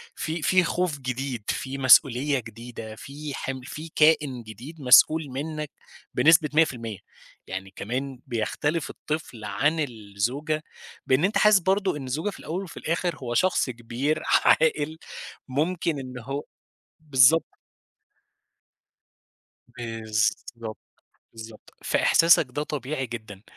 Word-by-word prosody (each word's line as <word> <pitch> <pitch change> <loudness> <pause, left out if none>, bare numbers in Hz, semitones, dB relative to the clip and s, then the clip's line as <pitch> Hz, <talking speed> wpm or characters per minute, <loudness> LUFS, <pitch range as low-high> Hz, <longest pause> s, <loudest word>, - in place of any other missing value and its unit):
في 160 +1 -3
في 185 +2 +4
خوف 170 -3 -1
جديد، 130 -3 -4
في 135 +1 -3
مسؤولية 135 +1 +5
جديدة، 115 -1 -9
في 145 +5 -8
حم 130 -1 -4
في 155 +5 -8
كائن 150 -6 +3
جديد 125 +9 -11
مسؤول 155 +5 +6
منك 150 +2 -4 0.4
بنسبة 160 -1 +5
100%، 120 - +1 0.5
يعني 95 +1 -6
كمان 130 +4 -4
بيختلف 145 +7 -1
الطفل 150 -8 -5
عن 145 +10 0
الزوجة 125 +5 -2 0.4
بإن 135 +7 +3
أنت 205 - +1
حاسس 210 -2 +6
برضو 190 0 +1
إن 135 -3 -6
الزوجة 155 +10 -2
في - - -10
الأول 180 +5 -4
وفي 175 - -11
الآخر 170 +2 -1
هو 120 -2 -5
شخص 185 -3 +2
كبير 120 +5 -2 0.2
عاقل 160 - +3 0.5
ممكن 160 +2 -1
إن 130 -1 -7
هو 135 +4 -5 0.6
بالضبط. 145 +1 +4 2.1
بالضبط، 115 -1 -3 0.6
بالضبط، 110 -1 -12
فإحساسك 165 -2 +4
ده 145 +4 -3
طبيعي 135 -2 -4
جدًا. 110 -4 -8
135 Hz, 115 wpm, -25 LUFS, 120-155 Hz, 2.1 s, مسؤول